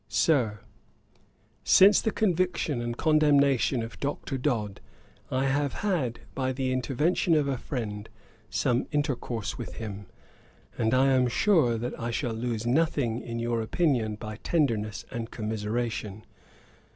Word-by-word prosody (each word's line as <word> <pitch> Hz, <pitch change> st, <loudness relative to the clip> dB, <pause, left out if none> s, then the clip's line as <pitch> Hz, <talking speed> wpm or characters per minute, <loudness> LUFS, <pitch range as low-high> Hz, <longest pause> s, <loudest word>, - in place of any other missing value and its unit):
'SIR, 115 Hz, -, +1 dB, 1.0 s
'Since 200 Hz, +2 st, +6 dB
the 220 Hz, -, 0 dB
conviction 180 Hz, -, 0 dB
and 120 Hz, 0 st, -4 dB
condemnation 140 Hz, -5 st, +3 dB
of 115 Hz, -, -9 dB
Dr. 140 Hz, 0 st, -3 dB
Dodd, 120 Hz, -7 st, -2 dB, 0.5 s
I 130 Hz, +1 st, 0 dB
have 140 Hz, +1 st, 0 dB
had, 145 Hz, -, -1 dB
by 130 Hz, -1 st, -1 dB
the 130 Hz, 0 st, -1 dB
intervention 150 Hz, +7 st, +1 dB
of 150 Hz, -2 st, +2 dB
a 135 Hz, -, 0 dB
friend, 105 Hz, -6 st, -5 dB, 0.4 s
some 125 Hz, 0 st, 0 dB
intercourse 125 Hz, -8 st, -2 dB
with -, -, -6 dB
him, 105 Hz, -3 st, -7 dB, 0.7 s
and 115 Hz, +1 st, +1 dB
I 135 Hz, +1 st, +4 dB
am 130 Hz, -1 st, +3 dB
sure 125 Hz, -, +3 dB, 0.2 s
I 115 Hz, -, -3 dB
shall 115 Hz, 0 st, -2 dB
lose 115 Hz, 0 st, -3 dB
nothing 125 Hz, -3 st, +1 dB
in 115 Hz, -1 st, -5 dB
your 115 Hz, 0 st, -1 dB
opinion 115 Hz, -4 st, 0 dB
by 110 Hz, 0 st, -7 dB
tenderness 115 Hz, -9 st, -1 dB
and 115 Hz, -1 st, -4 dB
commiseration. 110 Hz, -1 st, -3 dB
125 Hz, 130 wpm, -27 LUFS, 115-145 Hz, 1.0 s, Since